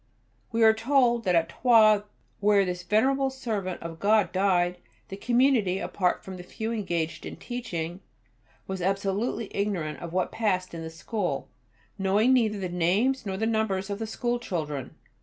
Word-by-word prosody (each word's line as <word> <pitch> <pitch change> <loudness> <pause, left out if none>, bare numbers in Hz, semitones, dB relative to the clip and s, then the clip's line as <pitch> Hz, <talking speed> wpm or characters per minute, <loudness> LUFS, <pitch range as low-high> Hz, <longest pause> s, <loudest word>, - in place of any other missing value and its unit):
We 230 0 +2
are 220 0 +7
told 240 0 +2
that 180 -2 +3
at 165 -1 +3
Troyes, 220 -4 +5 0.4
where 205 -1 +4
this 180 -1 -3
venerable 265 +8 +2
servant 215 -10 -4
of 165 -1 -7
God 210 +1 +3
died, 180 -2 +1 0.3
the - - -5
Community, 235 -3 +2
apart 185 -2 -1
from 190 -1 -8
the 180 - -9
few 220 +5 -5
engaged 170 -7 -2
in - - -7
teaching, 180 -9 -5 0.7
was 190 -1 -5
absolutely 195 +3 -1
ignorant 185 -7 -2
of 170 - -7
what 185 +1 0
passed 185 -5 -1
in 165 - -6
the 160 - -5
school, 165 - -3 0.5
knowing 205 +6 +3
neither 220 -5 +2
the 190 -2 -3
names 200 +9 +1
nor 190 -1 -2
the 220 - 0
numbers 215 -3 0
of 200 - -3
the 225 - -3
school 240 +2 -2
children. 150 - -4
200 Hz, 165 wpm, -27 LUFS, 180-225 Hz, 0.7 s, are